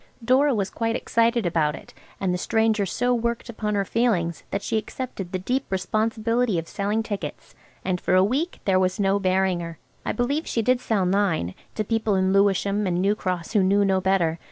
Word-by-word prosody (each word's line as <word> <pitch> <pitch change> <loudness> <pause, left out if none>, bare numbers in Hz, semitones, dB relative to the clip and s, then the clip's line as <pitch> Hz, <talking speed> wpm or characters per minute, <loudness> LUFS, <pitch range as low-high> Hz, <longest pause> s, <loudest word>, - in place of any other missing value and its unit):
Dora 265 +2 +4
was 195 -2 -1
quite 230 0 -1
excited 230 -1 +1
about 160 -3 +1
it, - - -13 0.3
and 185 -2 0
the - - 0
stranger 220 -1 +1
so 245 +7 0
worked 235 0 -2
upon 210 -2 -2
her 200 -1 +1
feelings 185 -8 0
that 200 0 -3
she 225 - -2
accepted 215 -5 -6
the 185 - -1
deep 250 +9 -1
responsibility 220 +3 0
of 165 0 -3
selling 210 +3 -1
tickets, 205 -3 -6 0.3
and 180 -1 -1
for - - +2
a 185 - +6
week 280 - -1
there 190 -2 +3
was 185 +1 0
no 195 0 +2
bearing 190 -1 +1
her. 165 -1 -6 0.3
I - - -1
believe 275 +8 -1
she 230 - 0
did 250 +2 +2
sell 205 -6 +1
nine, 180 - +1 0.2
to 215 - 0
people 220 -1 0
in 190 0 +2
Lewisham 200 +1 +2
and 175 -1 0
New 200 +3 +3
Cross 185 -3 -3
who 210 - +4
knew 200 +2 +3
no 190 -1 +2
better. 175 -4 +1
200 Hz, 205 wpm, -24 LUFS, 185-230 Hz, 0.3 s, a